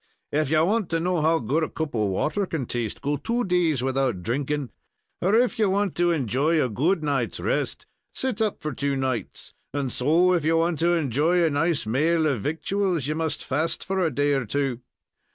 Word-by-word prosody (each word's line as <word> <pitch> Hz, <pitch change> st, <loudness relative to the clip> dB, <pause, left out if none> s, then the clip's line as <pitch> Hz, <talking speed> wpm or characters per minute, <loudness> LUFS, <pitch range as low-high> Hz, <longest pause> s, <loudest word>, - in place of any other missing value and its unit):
If 150 Hz, -1 st, +1 dB
ye 155 Hz, 0 st, +3 dB
want 200 Hz, +3 st, +1 dB
to 165 Hz, -, 0 dB
know 175 Hz, 0 st, 0 dB
how 160 Hz, +2 st, +3 dB
good 140 Hz, +5 st, 0 dB
a -, -, -2 dB
cup 160 Hz, -2 st, -4 dB
of 105 Hz, -3 st, +1 dB
water 155 Hz, -, -1 dB
can 155 Hz, -7 st, -3 dB
taste, 120 Hz, -1 st, -4 dB
go 145 Hz, +1 st, 0 dB
two 235 Hz, -, -1 dB
days 170 Hz, -, +1 dB
without 130 Hz, -8 st, 0 dB
drinking; 140 Hz, +4 st, -2 dB, 0.5 s
or 195 Hz, +4 st, +3 dB
if 245 Hz, 0 st, +2 dB
ye 215 Hz, -, +4 dB
want 200 Hz, -1 st, +1 dB
to 175 Hz, 0 st, +3 dB
enjoy 150 Hz, +1 st, +1 dB
a 130 Hz, -, +1 dB
good 155 Hz, -, +1 dB
night's 135 Hz, -, -1 dB
rest, -, -, -2 dB, 0.3 s
sit 255 Hz, -5 st, -2 dB
up 215 Hz, -2 st, -1 dB
for 155 Hz, -, -2 dB
two 140 Hz, 0 st, -1 dB
nights, 130 Hz, -3 st, -3 dB, 0.2 s
and 140 Hz, -3 st, -2 dB
so, 165 Hz, +8 st, +3 dB
if 170 Hz, -4 st, +1 dB
ye 160 Hz, +2 st, +2 dB
want 165 Hz, 0 st, +1 dB
to 170 Hz, +1 st, +3 dB
enjoy 160 Hz, +3 st, +2 dB
a 160 Hz, -, +1 dB
nice 155 Hz, 0 st, 0 dB
maal 155 Hz, +8 st, +2 dB
of 135 Hz, -8 st, 0 dB
victuals, 170 Hz, -, -1 dB
ye 155 Hz, -, 0 dB
must 160 Hz, 0 st, -2 dB
fast 155 Hz, +5 st, -1 dB
for 190 Hz, 0 st, -1 dB
a 165 Hz, -, +2 dB
day 145 Hz, +1 st, +1 dB
or 135 Hz, -3 st, 0 dB
two. 135 Hz, 0 st, -1 dB
155 Hz, 205 wpm, -25 LUFS, 135-175 Hz, 0.5 s, ye